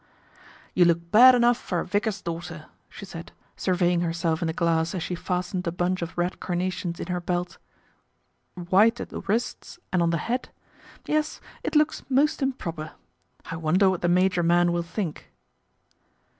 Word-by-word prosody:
* - - -24
You 180 - +5
look 170 0 +1
bad 250 +4 +9
enough 240 0 +4
for 175 - -2
a - - -3
vicar's 205 -1 -1
daughter," 165 -2 -6 0.2
she 200 - -10
said, 170 -3 -9 0.2
surveying 180 -2 +1
herself 165 -1 -1
in 170 - 0
the - - 0
glass 165 0 0
as 175 - -2
she 180 - -4
fastened 180 +1 -3
a - - +1
bunch 180 +1 -1
of 170 0 -5
red 175 +1 -1
carnations 180 -1 -3
in - - -4
her 180 0 -3
belt. 175 0 -3 0.5
" - - -46 0.2
White 220 +5 +5
at - - -5
the - - -6
wrists 225 - -3 0.2
and 180 - +3
on 170 - +2
the 165 - +1
hat, 250 +2 -2 0.6
yes, 305 0 -1 0.2
it - - -4
looks 305 +1 +3
most 280 +3 +2
improper. 170 - -3 0.5
I 165 - -5
wonder 180 +5 +3
what 185 - -3
the 175 - +1
major 180 0 +3
man 175 +1 +3
will 170 0 0
think 170 -1 -5
180 Hz, 180 wpm, -25 LUFS, 170-200 Hz, 0.6 s, bad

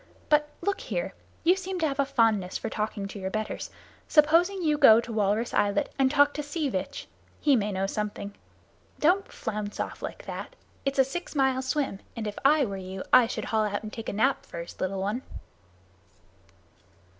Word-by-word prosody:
But 300 0 +4
look 400 +2 -1
here - - -3 0.3
you 355 +3 +5
seem 380 -1 -4
to 320 - +3
have 275 -1 -4
a 275 - +3
fondness 220 -8 +2
for 225 - -5
talking 210 -2 -3
to 200 - -8
your 190 0 -3
betters 215 +2 -3 0.4
suppose 320 +4 +5
you 350 -6 0
go 250 -7 +8
to 235 0 -5
Walrus 215 +2 +1
Islet 200 0 +1
and 265 -1 +4
talk 285 +1 +4
to 295 - -3
Sea 295 0 -2
Vitch. 190 -6 -4 0.3
He 290 -3 +4
may 210 -3 0
know 190 0 -1
something. 205 0 -4 0.7
Don't 365 +6 +2
flounce 210 -1 -4
off - - -4
like - - -6
that. - - -6 0.3
It's 275 0 -1
a 265 - +7
six 320 +6 -6
mile 265 -2 +2
swim, 265 -6 -1 0.2
and 225 -2 -4
if 210 -1 -4
I 285 0 +5
were 200 -3 -4
you 190 0 -6
I 255 -2 +8
should - - -4
haul 220 -1 +1
out 205 +1 -2
and 215 - -7
take 225 - -5
a - - -4
nap 265 +6 +2
first, 170 0 -8
little 190 +1 -1
one." 210 +6 -1
240 Hz, 190 wpm, -27 LUFS, 205-295 Hz, 0.7 s, go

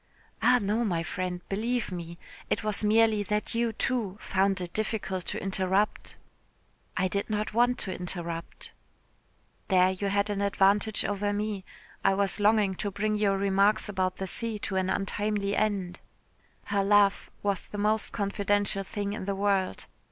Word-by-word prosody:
"Ah, 250 +2 +5
no, 210 +3 0
my 175 -7 0
friend, 180 +1 -3
believe 230 +3 -1
me. 170 -1 -6 0.3
It - - 0
was 215 0 -1
merely 220 0 +4
that 210 +1 -1
you, 230 0 +1
too, 220 -4 -2
found 195 0 +1
it 175 -1 -5
difficult 195 -4 -2
to - - -2
interrupt." 195 +1 0 0.8
"I 185 - +2
did 200 +3 -2
not 210 0 -2
want 245 +2 +3
to 190 - -3
interrupt." 170 -2 -4 1.0
"There 185 -1 +4
you 190 +2 -2
had 200 +1 +1
an 200 -1 -2
advantage 200 +2 +2
over 205 0 -1
me. 205 -1 -2 0.4
I 195 0 +4
was 200 0 0
longing 210 -1 +3
to 205 - -2
bring 210 +2 -1
your 200 -2 +2
remarks 200 +2 +2
about 185 -2 -1
the 190 - -4
sea 225 +3 -1
to 195 - -3
an 190 0 +1
untimely 205 +1 0
end." 200 -4 -1 0.6
Her 200 -1 0
laugh 200 0 +3
was 200 -2 -1
the 205 - -7
most 210 +1 +1
confidential 200 -1 0
thing 205 0 -3
in 205 - -5
the 200 0 -1
world. 195 -1 0
200 Hz, 160 wpm, -28 LUFS, 190-210 Hz, 1.0 s, Ah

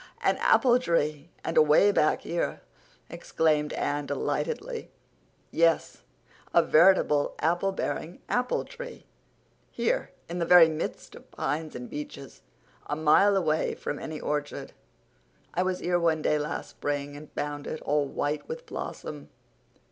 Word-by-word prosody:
"An - - +3
apple 250 -1 +4
tree—and 155 - -2
away 155 +7 +6
back 155 -6 +2
here!" 170 0 -2 0.5
exclaimed 150 -2 0
Anne 145 0 -2
delightedly. 465 - -3 0.6
"Yes, 165 0 +2 0.5
a - - +7
veritable 155 -4 +4
apple 175 +4 +1
bearing 175 -2 -4
apple 250 0 0
tree, - - -9
too, - - -30 0.6
here - - -1 0.2
in 175 +1 -4
the 170 - 0
very 175 -2 +8
midst 160 0 -5
of - - -14
pines 155 +3 -3
and 125 0 -6
beeches, 145 -2 -8 0.5
a 145 - -1
mile 160 +7 +4
away 160 -4 0
from 145 - -4
any 155 -1 -6
orchard. 150 -1 -3 0.8
I 180 - +1
was 185 0 0
here 175 0 +1
one 160 -2 +1
day 150 - +2
last 150 +2 -4
spring 145 0 -3
and 150 +1 -11
found 145 0 -4
it, 155 - -4
all 145 0 +1
white 145 +2 -3
with 485 +1 -6
blossom. - - -7
155 Hz, 140 wpm, -27 LUFS, 150-180 Hz, 0.8 s, very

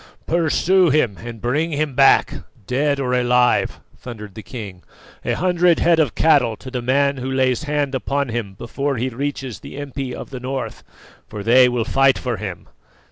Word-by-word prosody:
"Pursue 170 +2 +2
him 125 -9 +1
and 115 -1 -8
bring 145 +9 0
him 150 -1 -1
back, 135 +1 +4 0.3
dead 140 +5 0
or 125 -2 -1
alive!" 125 0 +2 0.2
thundered 105 -5 -9
the 110 - -8
king. 100 -5 -8 0.4
"A - - -1
hundred 180 -1 +2
head 170 -1 +3
of 150 -7 +1
cattle 140 -8 +3
to 130 - -10
the 125 -1 -3
man 140 +3 +1
who 130 +1 -4
lays 130 +1 +1
hand 145 -2 -1
upon 140 +1 -1
him 115 -4 -4
before 135 +6 -3
he 125 +3 -1
reaches 135 -2 -4
the - - -10
impi 140 -2 -5
of - - -9
the 130 - -6
North, 130 +1 -5 0.4
for 105 -2 -7
they 125 +3 +6
will 120 -2 -1
fight 135 +1 +3
for 125 -3 -3
him!" 95 -6 -7
130 Hz, 180 wpm, -20 LUFS, 120-145 Hz, 0.4 s, they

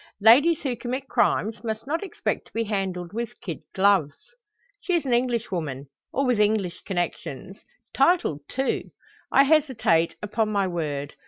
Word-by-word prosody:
"Ladies 280 +11 +6
who 260 -4 -1
commit 255 +3 -4
crimes 220 -4 +1
must 220 -1 -4
not 325 +7 -2
expect 380 - -3
to - - -25
be 230 - 0
handled 190 -4 -3
with 230 +1 -5
kid 170 -5 -6 0.2
gloves." 190 -7 +3 0.6
"She 360 - -1
is 330 - 0
an 255 - 0
Englishwoman, 190 - -1 0.2
or 275 - 0
with 250 -4 +2
English 205 -4 +1
connections; 175 -1 -4 0.3
titled, 275 - +3
too. 265 +1 -2 0.4
I 275 - +6
hesitate, 260 - +2
upon 215 +1 0
my 200 -2 +1
word. 150 -5 -3
215 Hz, 150 wpm, -25 LUFS, 180-260 Hz, 0.6 s, Ladies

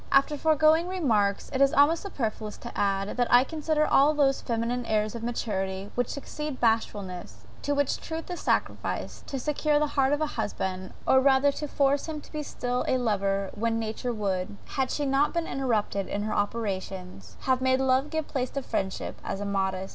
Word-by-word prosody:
After 275 +2 +4
the 290 - -5
foregoing 315 +2 +4
remarks, 225 - +1
it 265 - 0
is 275 0 +5
almost 295 +4 +5
superfluous 220 - -4
to - - -9
add, 195 0 0
that 245 -1 +1
I 245 +1 +8
consider 305 +1 0
all 295 +2 +4
those 275 -2 +3
feminine 235 +1 -1
airs 215 -1 +1
of 235 - -6
maturity, 200 -4 -3
which 245 -1 0
succeed 300 0 -5
bashfulness, 205 -6 -1 0.2
to 285 - 0
which 285 -1 0
truth 320 0 -5
is 355 - -4
sacrificed, - - -2
to 275 - -3
secure 300 +2 +1
the 300 - +3
heart 270 -1 +3
of 290 - +2
a 310 - +2
husband, 190 -7 -3
or 265 - +6
rather 270 +1 +4
to 295 +1 -5
force 280 +1 +1
him 310 -1 -4
to - - -16
be 305 - -3
still 250 -3 -2
a 260 - +3
lover 200 -4 0
when 225 +1 0
nature 225 +2 -2
would, 200 -3 -2
had 265 -2 -1
she 295 - -1
not 275 +4 +2
been 340 -1 0
interrupted 220 -8 -1
in 205 - -2
her 215 - -2
operations, 190 - -3
have 260 -1 +1
made 260 0 +3
love 265 +2 +2
give 315 -1 -2
place 255 -3 -2
to 275 - -4
friendship, 190 -5 -3
as - - -3
immodest. 190 -1 -1
250 Hz, 195 wpm, -27 LUFS, 205-285 Hz, 0.2 s, I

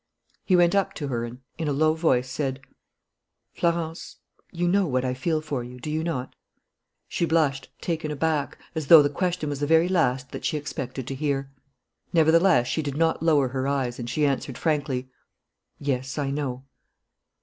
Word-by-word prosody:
He 185 - +3
went 175 -1 +5
up 200 -1 +1
to 145 -3 -4
her 120 -2 -1
and, 120 +2 -9 0.2
in 160 - -1
a - - +1
low 155 +2 +3
voice, 130 -6 +2
said: 135 0 -2 0.9
"Florence, 170 -1 -2 0.4
you 175 0 -1
know 195 +1 +3
what 130 -2 0
I 125 - 0
feel 155 +5 -1
for 145 -5 -3
you, 125 +1 -10
do 150 +5 -5
you 155 +1 -1
not?" 145 -7 -3 0.7
She - - -2
blushed, 155 -5 +1
taken 160 -3 -2
aback, 150 0 -1 0.2
as 160 -4 -3
though 160 -1 +10
the 145 - 0
question 180 0 -1
was 145 -1 -3
the 145 - -1
very 160 +2 +5
last 135 -8 +1
that - - -7
she 155 - 0
expected 135 -3 -5
to 135 - -4
hear. 135 -1 -2 0.6
Nevertheless, 165 -3 +5
she 160 - -1
did 145 -2 -4
not 165 -1 +2
lower 150 -5 +3
her 130 +1 -2
eyes, 130 -3 -1
and 120 0 -4
she 150 +5 +1
answered 135 -2 -1
frankly: 140 -5 -1 0.7
"Yes, 135 -1 -2
I 140 -2 -1
know." 135 -3 -3
145 Hz, 180 wpm, -25 LUFS, 130-160 Hz, 0.9 s, though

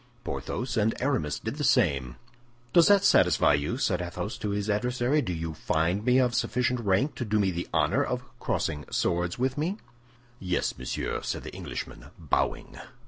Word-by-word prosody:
Porthos 125 +3 -4
and 110 +1 +1
Aramis 125 - 0
did - - -5
the - - -2
same. 65 -3 +2 0.6
"Does 170 -1 +7
that 200 -1 +5
satisfy 90 - +5
you?" 70 - 0
said 95 -9 0
Athos 90 +4 -4
to 105 - -3
his 100 0 -2
adversary. 125 +6 +1
"Do 95 - -3
you 80 -1 -4
find 85 +6 0
me 125 +2 +4
of 125 -2 +3
sufficient 125 +1 0
rank 105 +6 +1
to - - -4
do 110 -2 0
me 95 -2 +2
the 85 0 -4
honor - - +2
of - - -3 0.2
crossing 75 -2 -2
swords 85 0 0
with 130 +3 -1
me?" 175 +7 -1 0.6
"Yes, 90 -1 -1
monsieur," 65 0 -3
said - - -4
the - - -8
Englishman, - - -7
bowing. - - -2
105 Hz, 175 wpm, -27 LUFS, 85-125 Hz, 0.6 s, Does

